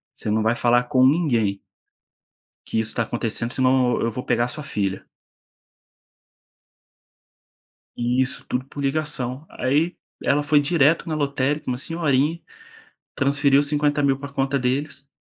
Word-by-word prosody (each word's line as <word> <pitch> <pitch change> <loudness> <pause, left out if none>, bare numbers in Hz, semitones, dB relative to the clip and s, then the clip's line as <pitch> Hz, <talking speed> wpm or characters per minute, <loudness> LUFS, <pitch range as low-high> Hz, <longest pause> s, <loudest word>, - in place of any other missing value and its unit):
Você - - -5
não 110 +1 +1
vai 115 +2 +2
falar 120 +1 +3
com 130 +1 +3
ninguém" 120 - +2 1.1
que - - -1
isso 110 -1 -1
está 115 - -1
acontecendo 115 0 -3
senão 130 -1 +2
eu 115 - 0
vou 125 +3 -6
pegar 120 - +1
a - - -3
sua 150 - -6
filha. 100 -8 -3 2.9
E 120 +2 +1
isso 130 - -3
tudo 125 +1 -2
por 140 +1 -8
ligação. 135 -1 -2
Aí, 150 +7 0 0.3
ela 145 +1 +2
foi 150 0 +4
direto 155 +1 +2
na 155 - -2
lotérica, 140 0 -1
uma 125 -1 -1
senhorinha, 155 +1 0 0.7
transferiu 140 +1 +3
R$50.000 145 -2 +1
pra 140 - -7
conta 135 0 0
deles 140 +2 -2
135 Hz, 140 wpm, -23 LUFS, 125-145 Hz, 2.9 s, foi